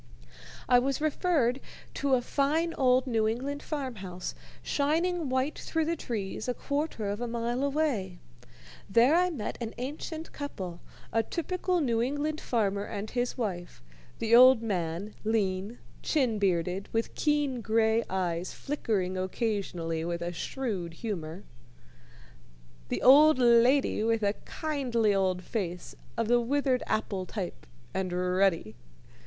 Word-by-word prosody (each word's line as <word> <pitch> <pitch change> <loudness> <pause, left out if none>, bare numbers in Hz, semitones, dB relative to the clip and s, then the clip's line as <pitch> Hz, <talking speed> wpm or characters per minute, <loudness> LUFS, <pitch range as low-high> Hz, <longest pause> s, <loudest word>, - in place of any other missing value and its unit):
I 245 0 +6
was 270 +1 -1
referred 300 -5 +1 0.3
to 275 -2 +2
a 245 - 0
fine 310 +6 +1
old 255 -1 +3
New 225 -4 +1
England 270 +6 -2
farm 270 -6 -4
house 185 - -6 0.3
shining 325 +2 0
white 260 +3 0
through 325 -1 -1
the 335 +2 0
trees 220 -7 -4
a 250 - -1
quarter 285 -7 -2
of 205 +3 -3
a 240 - -1
mile 235 +2 -2
away. 275 - 0 0.7
There 235 +8 +5
I 360 +1 +4
met 260 -12 -4
an 225 -1 -4
ancient 310 +5 -5
couple, 185 - -6 0.3
a 225 - +4
typical 355 - -1
New 235 -5 +1
England 290 +5 -1
farmer 200 -4 0
and 205 +1 -5
his 245 +1 -1
wife; 180 - -4 0.3
the 230 0 +3
old 255 -1 +8
man, 185 -1 -2
lean, 210 0 0 0.2
chin 250 -8 +1
bearded, 185 0 0
with 225 0 -1
keen 290 -5 0
gray 225 +1 +2
eyes 180 -2 -2
flickering 205 -10 -2
occasionally 185 -5 -2
with 170 0 -3
a 175 0 -3
shrewd 185 -5 -4
humor, 180 -4 -5 1.5
the - - -2
old 295 +3 +8
lady 240 0 +4
with 225 -1 +1
a 200 0 +2
kindly 250 -9 0
old 185 -2 +1
face 180 -6 -4 0.2
of 230 -1 0
the 240 +1 +4
withered 265 +1 +1
apple 195 -4 -1
type 190 -5 -6 0.3
and 190 -1 -2
ruddy. 180 - +1
230 Hz, 135 wpm, -29 LUFS, 195-275 Hz, 1.5 s, old